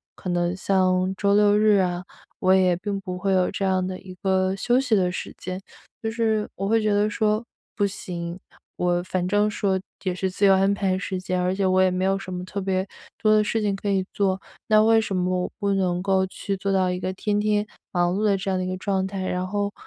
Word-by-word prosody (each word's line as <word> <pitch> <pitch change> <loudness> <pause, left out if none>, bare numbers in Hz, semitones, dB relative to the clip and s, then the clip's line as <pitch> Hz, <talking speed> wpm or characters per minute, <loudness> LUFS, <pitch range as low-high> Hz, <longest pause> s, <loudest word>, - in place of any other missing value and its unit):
可 185 - -6
能 175 0 0
像 185 -1 +1
周 200 0 +2
六、 205 0 +5
日 215 -1 +5
啊， 180 -1 -1 0.3
我 185 0 +4
也 185 -1 +4
并 200 +1 -3
不 180 -1 -5
会 195 +1 0
有 185 -1 +2
这 195 - -2
样 185 -1 +1
的 185 0 -5
一 185 -1 -11
个 190 0 +2
休 240 +5 +2
息 250 -5 +2
的 180 -2 +2
时 180 - -6
间。 185 +1 -5 0.4
就 225 - -2
是 220 -2 0
我 195 - -3
会 225 0 +3
觉 215 -1 +1
得 205 +1 +2
说 215 +1 0 0.3
不 205 - +2
行， 175 -2 -5 0.4
我 175 0 +1
反 180 -1 -2
正 205 +2 +2
说 195 -2 0 0.3
也 185 - 0
是 190 0 -2
自 200 +2 +1
由 195 - +7
安 195 +1 +3
排 195 -2 0
时 190 -1 -3
间， 185 0 -2
而 180 +1 +1
且 195 0 0
我 185 0 +3
也 185 -1 +4
没 185 +1 0
有 195 0 +2
什 185 -2 -7
么 180 0 -5
特 200 +2 -4
别 190 0 -1 0.3
多 215 -1 +5
的 215 - +4
事 220 +1 -1
情 205 -2 0
可 200 +1 -4
以 190 -1 +1
做， 195 -1 0 0.3
那 215 -1 +5
为 225 0 +5
什 200 - -4
么 180 0 0
我 - - -3
不 200 -1 +1
能 180 -2 0
够 190 -1 +2
去 195 +1 -4
做 195 +1 -2
到 190 -1 +2
一 180 - -1
个 185 +1 -3
天 205 +2 -1
天 210 0 +1 0.2
忙 175 0 +1
碌 205 - -1
的 205 -2 +3
这 195 +1 -4
样 190 - +1
的 185 - -1
一 185 - -3
个 185 - -3
状 190 -1 -1
态？ 190 -1 -4
然 180 0 -1
后 205 +1 -2
190 Hz, 265 characters per minute, -24 LUFS, 185-205 Hz, 0.4 s, 由